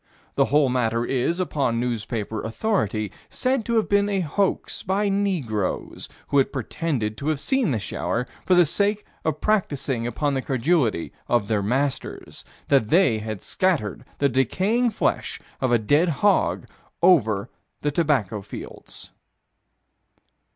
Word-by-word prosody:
The -, -, +3 dB
whole 145 Hz, 0 st, +3 dB
matter 120 Hz, -2 st, 0 dB
is, 135 Hz, +8 st, 0 dB
upon 140 Hz, -9 st, 0 dB
newspaper 110 Hz, -2 st, -2 dB
authority, 110 Hz, -, -1 dB, 0.2 s
said 255 Hz, -2 st, 0 dB
to 235 Hz, -, 0 dB
have 220 Hz, -, +2 dB
been 200 Hz, 0 st, +2 dB
a 195 Hz, -2 st, 0 dB
hoax 185 Hz, +5 st, -1 dB
by 200 Hz, +2 st, 0 dB
Negroes, 170 Hz, -, -2 dB, 0.2 s
who 140 Hz, -, +4 dB
had 135 Hz, -, +2 dB
pretended 130 Hz, -5 st, -2 dB
to 140 Hz, -, -5 dB
have 155 Hz, -2 st, +1 dB
seen 265 Hz, -, +1 dB
the 125 Hz, -, +1 dB
shower, 110 Hz, +5 st, -2 dB, 0.2 s
for 185 Hz, -, +3 dB
the 175 Hz, -1 st, +6 dB
sake 205 Hz, +6 st, 0 dB, 0.2 s
of 155 Hz, -1 st, -2 dB
practicing 140 Hz, -, 0 dB
upon 140 Hz, +4 st, -1 dB
the 135 Hz, -, 0 dB
credulity 130 Hz, -, 0 dB
of 120 Hz, -4 st, +1 dB
their 105 Hz, -2 st, +1 dB
masters: 130 Hz, +6 st, -2 dB, 0.2 s
that 135 Hz, -7 st, +3 dB
they 165 Hz, -, +4 dB
had 110 Hz, -2 st, -5 dB
scattered 165 Hz, -, 0 dB
the 140 Hz, -, +3 dB
decaying 190 Hz, -, +1 dB
flesh 215 Hz, -, -1 dB, 0.2 s
of 130 Hz, -, +1 dB
a 120 Hz, -, +5 dB
dead 145 Hz, +11 st, +2 dB
hog 200 Hz, +7 st, +2 dB, 0.4 s
over 110 Hz, -, +4 dB, 0.3 s
the 145 Hz, -, 0 dB
tobacco 140 Hz, -, +1 dB
fields. -, -, -10 dB
140 Hz, 145 wpm, -24 LUFS, 115-185 Hz, 0.4 s, the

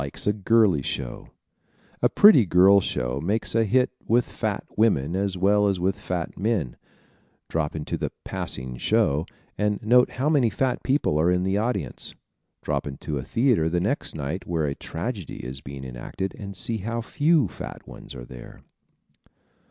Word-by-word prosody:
Likes 70 Hz, -, -3 dB
a 105 Hz, -, +3 dB
Girly 105 Hz, -6 st, +3 dB
Show 65 Hz, -1 st, -5 dB
¶ -, -, -35 dB, 0.7 s
A -, -, +4 dB
pretty 205 Hz, -, +7 dB
girl 95 Hz, +3 st, +6 dB
show 60 Hz, -4 st, -2 dB
makes 105 Hz, +7 st, +1 dB
a 115 Hz, 0 st, +3 dB
hit 125 Hz, +4 st, +2 dB, 0.2 s
with 120 Hz, +2 st, +3 dB
fat 110 Hz, -3 st, -3 dB
women 90 Hz, -8 st, +2 dB
as 95 Hz, -1 st, -1 dB
well 105 Hz, +2 st, +3 dB
as 95 Hz, -2 st, 0 dB
with 95 Hz, +2 st, +1 dB
fat 90 Hz, -3 st, -4 dB
men. 100 Hz, -, -1 dB, 0.7 s
Drop 80 Hz, -2 st, -1 dB
into 75 Hz, -1 st, -4 dB
the -, -, -2 dB
"Passing 65 Hz, -1 st, -4 dB
Show" 80 Hz, -, +1 dB, 0.3 s
and 105 Hz, 0 st, +1 dB
note 125 Hz, +3 st, +5 dB
how 130 Hz, +3 st, -1 dB
many 140 Hz, -7 st, +3 dB
fat 130 Hz, +1 st, -1 dB
people 130 Hz, -, +1 dB
are 85 Hz, +3 st, +3 dB
in 90 Hz, 0 st, +2 dB
the 95 Hz, +2 st, +1 dB
audience. 100 Hz, -, -2 dB, 0.5 s
Drop -, -, -2 dB
into 70 Hz, +1 st, -4 dB
a -, -, -5 dB
theater 115 Hz, -10 st, +2 dB
the 90 Hz, +1 st, 0 dB
next 105 Hz, +11 st, -2 dB
night 80 Hz, +5 st, -4 dB
where 80 Hz, -3 st, 0 dB
a 70 Hz, -, -1 dB
tragedy 95 Hz, -, -6 dB
is 65 Hz, +2 st, -6 dB
being 70 Hz, -1 st, -8 dB
enacted 65 Hz, +10 st, -5 dB
and 100 Hz, -2 st, -8 dB
see 115 Hz, +5 st, -1 dB
how 115 Hz, +3 st, -3 dB
few 150 Hz, +1 st, +2 dB
fat -, -, -9 dB
ones -, -, -11 dB
are -, -, -8 dB
there. -, -, -12 dB
95 Hz, 175 wpm, -25 LUFS, 75-115 Hz, 0.7 s, pretty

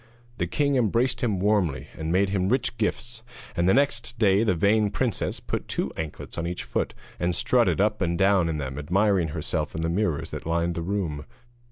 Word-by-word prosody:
The 85 Hz, -, 0 dB
king 140 Hz, -, +1 dB
embraced 120 Hz, +3 st, +2 dB
him 110 Hz, -7 st, 0 dB
warmly, 95 Hz, -9 st, +1 dB
and 80 Hz, 0 st, -3 dB
made 95 Hz, +2 st, +3 dB
him 95 Hz, -1 st, 0 dB
rich 125 Hz, 0 st, +1 dB
gifts; 115 Hz, +2 st, -2 dB, 0.3 s
and 85 Hz, +1 st, +2 dB
the -, -, +5 dB
next 120 Hz, -4 st, +1 dB
day 100 Hz, -1 st, +4 dB
the 105 Hz, -5 st, +2 dB
vain 105 Hz, +5 st, +3 dB
princess 115 Hz, -1 st, -2 dB
put -, -, -4 dB
two -, -, -2 dB
anklets 80 Hz, +1 st, -6 dB
on 85 Hz, -, -2 dB
each 90 Hz, +1 st, -4 dB
foot, -, -, -2 dB, 0.2 s
and 90 Hz, 0 st, 0 dB
strutted 115 Hz, -10 st, +2 dB
up 105 Hz, +1 st, +1 dB
and 85 Hz, -1 st, 0 dB
down 95 Hz, -3 st, +3 dB
in 80 Hz, -, -2 dB
them 70 Hz, -1 st, -4 dB
admiring 95 Hz, +3 st, +2 dB
herself 80 Hz, 0 st, -3 dB
in 80 Hz, -, -2 dB
the 80 Hz, -, 0 dB
mirrors 85 Hz, -4 st, -1 dB
that -, -, -6 dB
lined 85 Hz, +1 st, 0 dB
her -, -, -1 dB
room. 85 Hz, -5 st, -2 dB
95 Hz, 200 wpm, -26 LUFS, 85-110 Hz, 0.3 s, the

